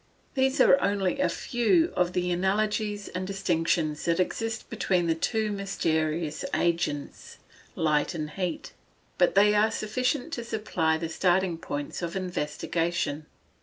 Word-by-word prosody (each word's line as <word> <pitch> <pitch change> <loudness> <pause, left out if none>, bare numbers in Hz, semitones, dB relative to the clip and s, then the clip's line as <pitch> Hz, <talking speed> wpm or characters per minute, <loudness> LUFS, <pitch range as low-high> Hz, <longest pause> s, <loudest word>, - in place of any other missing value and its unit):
These 265 0 +1
are 275 - +6
only 200 +4 0
a - - +2
few 320 +8 +1
of 180 0 +1
the 180 -1 0
analogies 205 +3 0
and 185 0 -4
distinctions 165 -5 0
that 170 0 +1
exist 225 +4 -2
between 180 -2 0
the 165 - +2
two 215 +6 -1
mysterious 160 -5 -1
agents, 165 -4 -2 0.4
light 150 0 +1
and 155 -2 -4
heat. 180 -1 -4 0.5
But 180 -1 +4
they 205 +1 +6
are 210 +1 +4
sufficient 250 +8 -1
to 240 - -3
supply 210 -8 0
the 165 +1 -3
starting 180 +1 +1
points 145 0 -5
of 170 0 -4
investigation. 165 -3 -2
180 Hz, 135 wpm, -27 LUFS, 165-210 Hz, 0.5 s, are